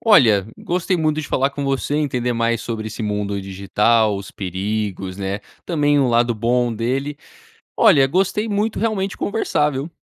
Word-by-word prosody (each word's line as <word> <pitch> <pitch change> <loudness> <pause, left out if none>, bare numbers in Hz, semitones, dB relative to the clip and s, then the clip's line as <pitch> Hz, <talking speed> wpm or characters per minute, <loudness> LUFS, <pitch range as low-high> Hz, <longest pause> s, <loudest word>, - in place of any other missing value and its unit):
Olha, 115 - +5
gostei 180 +1 -1
muito 155 -2 0
de 150 - -7
falar 135 +1 +1
com 140 0 -5
você 135 +1 -1
e - - +1
entender 125 -5 0
mais 115 0 0
sobre 110 -2 -4
esse 110 - -6
mundo 105 -1 -2
digital, 105 +3 +1
os 100 -1 -8
perigos, 95 0 -3
né, 100 0 -3 0.2
também 145 -4 +2
o 135 - +3
lado 120 0 +2
bom 120 +2 +1
dele. 130 +6 -2 0.6
Olha, 135 -2 +6
gostei 195 +8 0
muito 210 +2 -1
realmente 200 -4 -1
conversar, 160 -8 0
viu? 140 +3 -4
125 Hz, 165 wpm, -20 LUFS, 105-150 Hz, 0.6 s, Olha